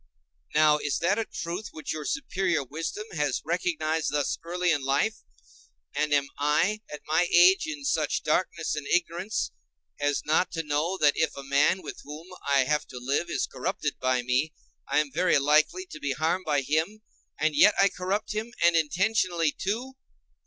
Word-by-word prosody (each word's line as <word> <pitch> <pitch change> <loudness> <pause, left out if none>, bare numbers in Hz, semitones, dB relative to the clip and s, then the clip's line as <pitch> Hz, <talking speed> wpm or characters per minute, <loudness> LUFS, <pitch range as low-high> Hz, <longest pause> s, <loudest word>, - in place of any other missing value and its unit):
Now 150 0 +5
is 145 -2 -1
that 190 +6 +1
a 225 - -1
truth 175 +4 -5
which 155 - -5
your 155 -1 -5
superior 190 - -1
wisdom 160 +10 -5
has 150 -5 -1
recognized 160 -2 -1
thus 145 -1 0
early 175 +1 0
in 145 -4 0
life, 140 +12 +1 0.8
and 150 0 0
am 140 -1 +3
I, 165 +9 +2
at 150 - -7
my 160 +3 +2
age, 185 - +6
in 310 -3 -6
such 160 - 0
darkness 165 0 0
and 150 -2 -5
ignorance 180 +4 -1 0.5
as 145 0 0
not 155 +4 +2
to 165 -1 -2
know 155 +5 -1
that 150 -4 +4
if 160 - 0
a 140 - -6
man 140 +7 +2
with - - -7
whom 150 +5 -10 0.2
I 140 -1 +4
have 150 +3 0
to - - -10
live 140 +7 -1
is - - 0
corrupted - - -3
by 130 -1 +1
me, 130 +5 0 0.3
I - - 0
am 145 -2 -6
very 175 +4 +3
likely 155 - +2
to - - -8
be 140 -1 -1
harmed 160 +7 -1
by 145 -2 +1
him, 160 +10 -1 0.3
and 155 -1 0
yet 210 +8 +6
I 195 - +6
corrupt 195 +4 -3
him, 220 +3 -4
and 170 0 +5
intentionally, 175 0 +1
too? 245 - -4
160 Hz, 180 wpm, -27 LUFS, 150-185 Hz, 0.8 s, age